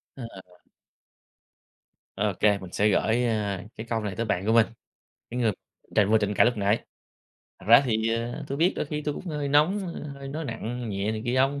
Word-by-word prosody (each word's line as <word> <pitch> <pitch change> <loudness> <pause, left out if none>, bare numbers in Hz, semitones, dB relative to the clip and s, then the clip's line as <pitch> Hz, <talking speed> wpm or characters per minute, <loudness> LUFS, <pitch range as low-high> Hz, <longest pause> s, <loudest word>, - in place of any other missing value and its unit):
Ờ. 130 - -8 1.9
Ô 105 0 0
kê, 105 -1 +4
mình 95 -2 -10
sẽ 105 +3 +2
gửi, 115 +4 +2
ờ, 105 -5 -1 0.2
cái 110 - -6
câu 115 -1 0
này 105 -3 -4
tới 115 - -2
bạn 95 -3 -1
của 110 - +2
mình, 115 -1 +5 0.6
cái 125 - -4
người 115 -3 +3 0.4
tranh 105 -1 +4
vừa 110 - +6
tranh 105 -1 0
cãi - - +5
lúc 120 -1 +1
nãy: 105 +2 +1 0.7
"Thật - - -15
ra 115 +3 +9
thì, 110 -2 +1
ờ, 120 +4 -4
tui 140 - -2
biết 175 +4 +4
đôi - - -2
khi 150 0 -4
tui 150 -1 -2
cũng - - -8
hơi 150 -4 -2
nóng, 150 +8 +4 0.4
hơi 140 0 -8
nói 155 +4 -4
nặng 120 -1 -4
nhẹ 100 +1 -1
này 110 0 -4
kia 120 +1 0
ông, 135 +2 +2
115 Hz, 210 wpm, -26 LUFS, 105-135 Hz, 1.9 s, ra